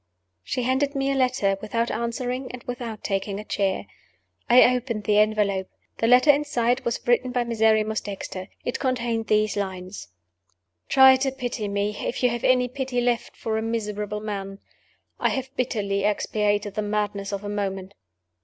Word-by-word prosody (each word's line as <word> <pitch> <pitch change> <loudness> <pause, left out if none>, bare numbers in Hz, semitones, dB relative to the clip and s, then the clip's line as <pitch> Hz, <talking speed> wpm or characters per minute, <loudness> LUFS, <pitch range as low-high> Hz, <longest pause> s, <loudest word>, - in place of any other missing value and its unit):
She 250 - -2
handed 270 +3 +1
me 275 0 0
a - - 0
letter 250 -7 +1
without 230 +2 -1
answering 245 +3 -3
and 250 -1 -9
without 240 -3 -6
taking 195 0 -2
a - - -6
chair. 195 -3 -1 0.6
I 250 +1 +7
opened 235 -4 -3
the 210 +1 +3
envelope. 210 -3 +1 0.3
The 225 - +2
letter 250 +5 +7
inside 270 -3 0
was 235 -1 -1
written 245 +1 +2
by 245 -1 +1
Miserrimus 220 -2 +2
Dexter. 195 -2 -6 0.2
It 245 - -2
contained 235 -4 -1
these 215 -1 +2
lines: 190 -1 -5 0.8
"Try 265 -1 +8
to 265 +1 0
pity 245 -5 -4
me, 200 +1 -1
if 250 - -3
you 250 - +4
have 240 0 -4
any 250 -1 +4
pity 260 -1 -3
left 240 -1 -1
for 220 -1 -2
a - - -2
miserable 210 -2 -3
man; 195 -2 -5 0.6
I - - +2
have 265 +1 -4
bitterly 200 -6 -1
expiated 205 0 0
the 215 - -1
madness 205 -1 -2
of 200 0 -4
a - - -5
moment. 195 -2 -3
225 Hz, 165 wpm, -24 LUFS, 205-250 Hz, 0.8 s, Try